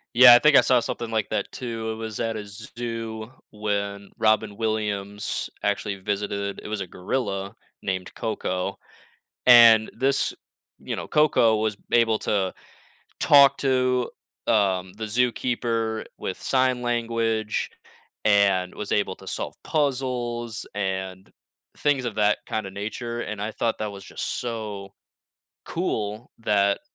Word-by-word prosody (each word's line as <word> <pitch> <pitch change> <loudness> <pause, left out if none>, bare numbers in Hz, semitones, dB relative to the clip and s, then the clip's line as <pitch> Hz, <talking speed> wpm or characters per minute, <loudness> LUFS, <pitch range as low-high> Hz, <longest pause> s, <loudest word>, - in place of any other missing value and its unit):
Yeah, 125 0 +10
I - - +9
think 150 -1 +6
I - - +10
saw 125 -2 +3
something 115 0 -4
like 110 -2 0
that 110 - -2
too, 115 -3 -4
it - - -4
was 110 -1 -6
at 115 -1 -1
a 105 - -5
z 100 +2 -8
zoo 115 -2 -5 0.2
when 100 -1 -3
Robin 110 -1 +2
Williams 105 -2 -2
actually 100 0 -1
visited, 100 0 -3
it - - -9
was 110 -1 -3
a 95 - -3
gorilla 100 +1 -3 0.3
named 95 -1 -3
Koko, 95 -5 -2 0.7
and 115 -3 +8
this 135 +1 +2 0.5
you - - -4
know, - - -6
Koko 130 -7 +4
was 110 -1 -1 0.2
able 115 -2 +3
to 95 -3 0 0.7
talk 140 -1 +7
to, 130 -2 +1 0.4
um, 95 -3 +2
the 110 - -7
zookeeper 115 -1 0
with 95 - -5
sign 130 -2 +1
language, 115 -2 -1 0.6
and 100 -3 +3
was 105 - -5
able 100 -2 0
to 95 - -15
solve - - -4
puzzles, 125 -6 -1
and 95 -1 -3 0.5
things 145 -3 +1
of 115 -3 -4
that 105 -1 +3
kinda 110 -3 -3
nature, 115 +4 -5
and 105 -1 -5
I 105 +1 -2
thought 115 +1 -1
that 105 -1 -3
was 100 -1 -10
just - - -5
so 105 -5 -5 0.7
cool 110 - -3
that 100 -3 +2
110 Hz, 140 wpm, -25 LUFS, 100-120 Hz, 0.7 s, Yeah